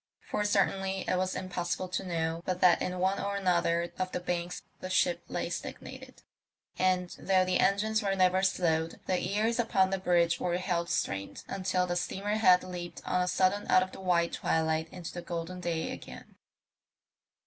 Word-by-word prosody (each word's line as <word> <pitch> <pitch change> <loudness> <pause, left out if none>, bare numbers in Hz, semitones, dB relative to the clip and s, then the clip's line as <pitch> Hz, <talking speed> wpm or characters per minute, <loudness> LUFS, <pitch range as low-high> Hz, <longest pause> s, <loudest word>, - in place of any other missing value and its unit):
For 210 - +1
certainly 195 -1 +1
it - - +2
was 185 0 0
impossible 180 0 -3
to 185 - -2
know 165 -2 -2
but 180 0 -2
that 180 -2 +5
in 180 0 -2
one 190 +2 +1
or 200 0 -2
another 170 -3 +1
of 185 0 -1
the - - -2
banks 175 0 -3 0.2
a 185 - -5
ship 260 +8 +2
lay - - -2
stagnated; - - -7 0.6
and, 185 -1 +2
though 185 -1 +3
the 185 0 +1
engines 215 +3 +2
were 195 -2 0
never 185 0 +3
slowed, 165 -4 +1
the 185 -1 +1
ears 220 +4 0
upon 195 -5 +2
the 195 - 0
bridge 170 -2 +2
were 175 -1 0
held 175 -2 -1
strained 100 - -2
until 185 -1 0
the 175 -1 -2
steamer 195 +4 -1
had 185 -4 +5
leaped 180 -1 -7
on 180 - +1
a 180 - 0
sudden 190 +3 +1
out 185 - +6
of 185 - -7
the - - -10
white 170 -2 +2
twilight 160 0 0
into 180 -3 -7
the 175 - -5
golden 175 +1 -5
day 170 -2 -2
again. 65 0 -10
185 Hz, 180 wpm, -30 LUFS, 175-190 Hz, 0.6 s, out